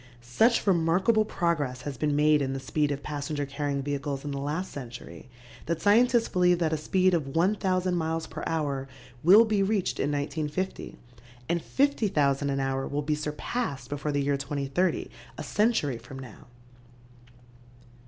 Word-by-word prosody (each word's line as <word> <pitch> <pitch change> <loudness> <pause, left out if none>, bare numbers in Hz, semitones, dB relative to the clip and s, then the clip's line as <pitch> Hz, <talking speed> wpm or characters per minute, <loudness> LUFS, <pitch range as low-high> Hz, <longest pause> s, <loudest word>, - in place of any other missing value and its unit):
Such 220 - +2
remarkable 190 +4 +3
progress 155 -10 -1
has 145 -2 -4
been 145 +4 0
made 150 0 +4
in 135 -1 -1
the 135 - -3
speed 150 +2 0
of 140 0 -4
passenger 145 0 -3
carrying 140 0 -3
vehicles 140 0 -3
in 145 - -3
the 140 - -3
last 150 +7 -3
century 120 -7 -9 0.4
that 170 0 -1
scientists 235 +4 +4
believe 180 -1 +3
that 165 -2 0
a - - +3
speed 185 +4 +2
of 145 -5 -1
1,000 185 0 +1
miles 160 -1 -1
per - - -7
hour 145 -4 -2 0.4
will 200 +8 +8
be 215 -2 +1
reached 195 -1 0
in 145 - 0
1950 150 +5 -3 0.5
and 170 0 0
50,000 160 - +1
an 135 0 -1
hour 135 0 -1
will 145 +1 -2
be 150 +1 0
surpassed 150 - -3
before 145 +1 -3
the 145 -1 0
year 140 0 +1
2030, 140 +5 -1 0.3
a - - -5
century 205 - +1
from 125 +3 -11
now. 125 -4 -11
150 Hz, 160 wpm, -27 LUFS, 140-185 Hz, 0.5 s, will